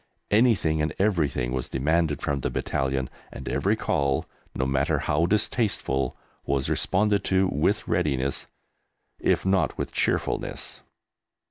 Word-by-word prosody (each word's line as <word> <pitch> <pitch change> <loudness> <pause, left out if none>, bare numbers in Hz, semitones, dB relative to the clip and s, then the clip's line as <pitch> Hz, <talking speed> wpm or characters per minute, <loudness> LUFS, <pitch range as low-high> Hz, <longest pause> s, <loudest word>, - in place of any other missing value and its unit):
Anything 105 -9 +3
and 75 - -1
everything 75 - +1
was 65 -1 -3
demanded 75 +2 +1
from 70 -1 0
the - - -1
battalion, 65 -1 -1 0.2
and 65 - -9
every - - +1
call, 70 -1 0 0.3
no 65 - 0
matter 70 +4 +1
how 75 +4 +1
distasteful, 105 - 0 0.3
was 70 -1 0
responded 105 +1 +1
to 95 0 +3
with 75 - 0
readiness, 70 -2 0 0.7
if - - +1
not 95 -1 +2
with - - -3
cheerfulness. - - -2
75 Hz, 125 wpm, -26 LUFS, 65-95 Hz, 0.7 s, Anything